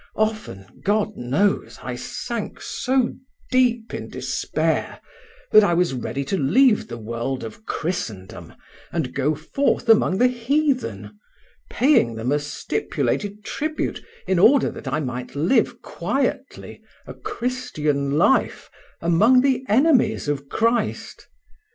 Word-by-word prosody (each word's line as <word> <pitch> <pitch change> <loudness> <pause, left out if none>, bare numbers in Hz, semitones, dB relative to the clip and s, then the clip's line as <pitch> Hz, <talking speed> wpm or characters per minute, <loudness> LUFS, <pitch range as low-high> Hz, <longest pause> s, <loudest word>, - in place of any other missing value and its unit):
Often, 215 - -3
God 210 +1 +1
knows, 145 +12 0
I - - -4
sank - - -5
so 260 -2 0 0.4
deep 245 -3 +2
in - - -5
despair - - -2 0.5
that 215 - +8
I 175 -4 +2
was 175 -4 +1
ready 135 +2 -3
to 195 - -1
leave 230 - +3
the 120 - -7
world 115 +4 -4
of 115 - -9
Christendom 110 - -5 0.4
and 150 -7 -2
go 145 +3 0
forth 245 - -1
among 215 -4 +4
the 250 +4 +5
heathen, 245 - -1 0.5
paying 245 - +3
them 115 +4 -2
a 145 - +2
stipulated 205 +7 -3
tribute 310 +1 -3 0.2
in 190 -2 +1
order 275 +9 +5
that - - -10
I 155 - -1
might 125 -2 -5
live 180 - +1
quietly 265 +9 -3 0.2
a - - -8
Christian 150 - -2
life 265 +11 +2 0.3
among 210 +10 +5
the 265 -1 +1
enemies 265 - +3
of 140 -1 -3
Christ. 230 -1 -1
200 Hz, 125 wpm, -22 LUFS, -, 0.5 s, that